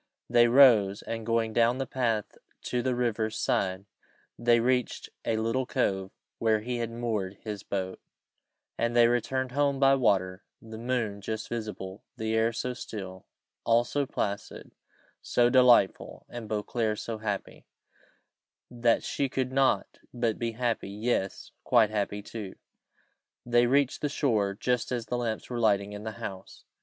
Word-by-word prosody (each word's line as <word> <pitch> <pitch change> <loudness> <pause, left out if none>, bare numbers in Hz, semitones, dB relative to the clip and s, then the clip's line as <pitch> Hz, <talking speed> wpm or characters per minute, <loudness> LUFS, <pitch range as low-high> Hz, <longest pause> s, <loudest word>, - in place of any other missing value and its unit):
They 120 0 +6
rose, 115 -6 +6
and 115 -1 -5
going 115 -1 +1
on - - -11
down 120 +2 +3
the 135 - -2
path 115 -5 -1 0.3
to 125 - -1
the 125 0 0
river's 110 -3 -1
side, 95 0 0 0.5
they 120 0 +3
reached 125 0 0 0.2
a 110 - +1
little 115 +3 0
cove 95 -1 0 0.3
where 110 -1 +2
he 120 +2 -3
had 115 -1 -2
moored 110 -5 -3
his 105 -3 -5
boat, 95 -2 -4 0.8
and 115 0 0
they 120 -1 +7
returned 125 +2 0
home 140 0 +1
by 135 0 +5
water 95 -7 +1 0.2
the 110 0 -10
moon 115 -4 -2
just 110 +2 -4
visible, 105 -4 -6
the 110 -1 -2
air 110 +1 +2
so 125 +2 -3
still; 95 -6 -8 0.4
all 115 +1 +4
so 140 +3 -2
placid, 100 -3 -4 0.5
so 120 0 +2
delightful, 125 -6 +4
and 120 -3 -7
Beauclerc 110 +1 -1
so 110 0 -5
happy, 105 -2 -5 1.0
that 120 -1 +2
she 140 -1 -1
could 130 0 -2
not 135 0 +1
but 120 -3 -1
be 115 -1 -2
happy; 115 -4 -1
yes 105 -1 -2
quite 115 -4 +4
happy 105 -1 -2
too. 105 -3 -7 0.9
They 120 0 +4
reached 140 +1 +2
the 150 - 0
shore 110 -9 0
just 125 +2 -1
as 120 -2 -2
the 125 - -2
lamps 115 0 -3
were 120 - -2
lighting 105 -2 +2
in 105 +1 -7
the 110 - -4
house. 95 -2 -8
115 Hz, 155 wpm, -28 LUFS, 105-125 Hz, 1.0 s, they